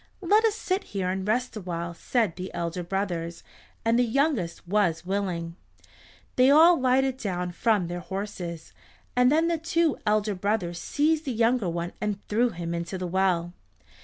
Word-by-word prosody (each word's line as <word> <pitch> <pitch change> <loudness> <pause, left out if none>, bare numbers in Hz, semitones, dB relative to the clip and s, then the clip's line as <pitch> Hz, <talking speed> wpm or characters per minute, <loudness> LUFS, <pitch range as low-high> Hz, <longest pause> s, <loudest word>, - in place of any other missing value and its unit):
"Let 415 +5 +4
us 435 -2 +2
sit 385 -1 -1
here 185 -1 0
and 190 +1 -3
rest 245 +3 0
awhile," 170 -4 -4
said 210 +2 0
the 185 +1 -6
elder 170 +1 -3
brothers, 175 -2 -3 0.4
and 230 +1 +3
the - - +5
youngest 235 - 0
was 175 -4 +1
willing. 180 -3 -2 0.8
They 255 +1 +6
all 325 +3 +7
lighted 260 0 +2
down 180 -6 -3
from 210 +1 +1
their 175 +1 -4
horses, 180 -3 -6 0.4
and 250 +1 +5
then 320 +2 +3
the 335 -1 0
two 330 -2 +1
elder 210 0 +2
brothers 180 -3 -1
seized 310 - +1
the 270 - -1
younger 230 -3 +2
one 170 +1 -3
and 210 -2 -1
threw 235 +4 +2
him 170 -4 -5
into 170 +2 -4
the 180 - -4
well. 175 -1 0
200 Hz, 165 wpm, -26 LUFS, 175-255 Hz, 0.8 s, all